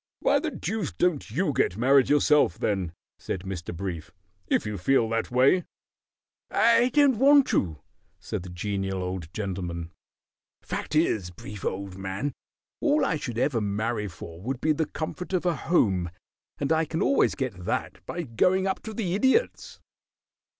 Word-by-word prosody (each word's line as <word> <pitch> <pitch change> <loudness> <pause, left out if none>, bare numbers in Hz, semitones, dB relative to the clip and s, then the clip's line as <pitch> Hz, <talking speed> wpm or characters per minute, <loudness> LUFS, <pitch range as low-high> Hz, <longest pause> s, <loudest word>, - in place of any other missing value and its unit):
"Why - - +3
the - - -2
deuce 220 -7 -3
don't 175 -9 0
you 150 - 0
get 90 - +1
married 130 +2 +4
yourself, 145 - +4
then," 95 -5 -1 0.3
said 90 - -4
Mr. 95 -2 -5
Brief. 85 -2 -5 0.4
"If - - +1
you 105 -2 -4
feel 120 +4 +3
that 115 0 -1
way 130 +9 +4 0.5
" - - -67
"I 235 +2 +4
don't 270 -3 +4
want 280 +1 +7
to," 80 -5 0 0.4
said - - -4
the 90 - -9
Genial 95 +1 -3
Old 90 -3 -5
Gentleman. 90 -4 -4 0.7
"Fact - - -4
is, 110 - +2
Brief, 100 +3 -10
old 95 0 -4
man, 95 +9 -3 0.5
all 300 -1 +3
I 165 - 0
should 120 -6 -5
ever 125 -2 +1
marry 105 +1 -1
for 85 -2 -10
would 125 +4 -3
be 155 - +2
the 155 0 -1
comfort 180 +4 -5
of 180 -1 0
a 175 -2 +2
home, 95 - +1 0.5
and 140 +1 -2
I 160 0 +3
can 165 +5 -1
always 275 - +3
get 115 -10 -4
that - - -3
by 175 - -3
going 180 +9 +2
up 190 - -1
to 220 -1 -7
the 190 -6 -1
Idiot's." 265 - +1
120 Hz, 165 wpm, -26 LUFS, -, 0.7 s, want